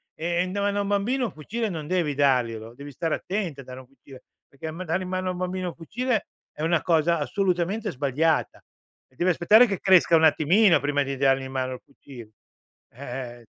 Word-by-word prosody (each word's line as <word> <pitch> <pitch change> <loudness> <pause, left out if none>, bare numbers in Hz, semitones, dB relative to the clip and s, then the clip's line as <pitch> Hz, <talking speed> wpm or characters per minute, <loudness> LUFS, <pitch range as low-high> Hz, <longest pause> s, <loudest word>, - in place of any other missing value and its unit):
e 170 +2 -1
n 185 - -6
da 200 - -2
mano 205 0 0
a - - +1
un - - -4
bambino 230 +6 0
un 220 - -4
fucile 220 +9 -4
non 155 -4 -6
devi 175 -5 0
darglielo, 120 -5 0
devi 140 +2 -10
stare 165 +3 -2
attento 180 -8 -4
a - - -13
dare 130 0 -10
un 125 - -19
fucile 135 -1 -16 0.2
perché 155 +3 -8
m 175 +4 -6
dare 170 +4 -1
in 180 - -7
mano 185 0 -2
a - - 0
un - - -8
bambino 185 0 -3
un - - -10
fucile 225 +7 -2 0.2
è 150 - -10
una 165 0 +2
cosa 170 0 +2
assolutamente 185 +4 -1
sbagliata. 145 +4 0 0.4
E 130 - -31
devi 180 +6 +2
aspettare 210 +8 +6
che 195 -3 -3
cresca 185 -3 +5
un 160 - +1
attimino 170 +4 +4
prima 145 0 0
di 135 0 -4
dargli 135 0 +2
in 130 - -8
mano 130 -1 -2
il 125 - -9
fucil 125 -5 -13 0.6
eh, 125 -1 -7
eh. - - -23
165 Hz, 220 wpm, -25 LUFS, 135-185 Hz, 0.6 s, aspettare